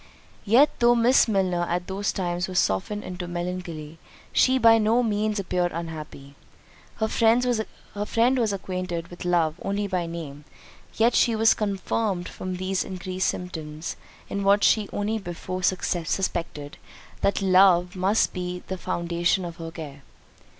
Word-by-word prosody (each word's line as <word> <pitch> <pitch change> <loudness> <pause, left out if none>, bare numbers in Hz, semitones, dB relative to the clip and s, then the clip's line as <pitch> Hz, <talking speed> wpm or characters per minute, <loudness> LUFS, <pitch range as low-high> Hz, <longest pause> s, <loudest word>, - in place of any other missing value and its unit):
Yet 250 +8 +5
though 240 0 +5
Miss 240 +3 +4
Milner 190 -5 +1
at 175 +1 -1
those 195 +2 -2
times 175 -1 -2
was 185 -1 -4
softened 180 - 0
into 180 -1 -6
melancholy, 175 -3 -5 0.3
she 260 0 +4
by 230 -2 +6
no 225 +3 +3
means 215 -1 0
appeared 180 -2 -1
unhappy. 155 -4 -7 0.6
Her 220 - 0
friend 230 +3 +3 0.9
was 225 -3 +1
acquainted 185 -3 -4
with 175 0 -9
love 170 -2 +1
only 200 +1 -1
by 180 -3 -2
name; 155 -4 -7 0.5
yet 230 +2 +3
she 230 - +3
was 225 +1 +5
confirmed 200 -2 -2
from 185 0 -5
these 185 +1 -1
increased 185 0 -3
symptoms, 160 -3 -5 0.3
in 200 - -3
what 200 +1 +4
she 215 -2 +4 0.3
before 185 -1 -6
only 185 - -6 0.4
suspected, 165 -5 -3 0.4
that 200 0 +1
love 185 -1 +5
must 190 +4 +2
be 180 -1 -4
the 190 -1 -4
foundation 175 +2 0
of 170 -1 -7
her 165 -2 -6
care. 150 -4 -9
185 Hz, 145 wpm, -25 LUFS, 170-205 Hz, 0.9 s, by